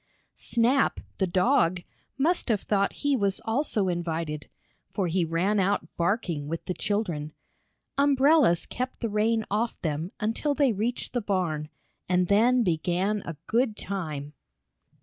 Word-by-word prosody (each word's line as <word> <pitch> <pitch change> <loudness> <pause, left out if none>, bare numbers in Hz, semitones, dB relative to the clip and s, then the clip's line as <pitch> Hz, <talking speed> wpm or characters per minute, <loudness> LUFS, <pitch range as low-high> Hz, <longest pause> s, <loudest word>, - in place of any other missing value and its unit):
Snap, 245 +4 +1 0.2
the 190 - +2
dog, 175 -1 +2 0.3
must 320 +2 +1
have 215 -4 +2
thought 200 -1 +1
he 285 -1 +4
was 200 -5 0
also 225 -4 +1
invited, 165 -4 -3 0.4
for 195 - -1
he 175 +1 +1
ran 175 +6 +1
out 195 -3 0
barking, 170 -5 -1
with 165 +2 -4
the 180 - -2
children. 170 -8 -2 0.7
Umbrellas 280 - +4
kept 255 +1 -5
the 230 - -1
rain 220 +2 +1
off 225 +3 -1
them 160 +3 -2
until 230 +7 0
they 275 -5 +3
reached 225 +5 -2
the 245 - 0
barn, 175 -7 -1 0.4
and 180 -1 +2
then 240 +5 +4
began 185 +3 0
a 165 -3 -5
good 230 -2 +1
time. 150 -7 -5
200 Hz, 140 wpm, -27 LUFS, 170-230 Hz, 0.7 s, he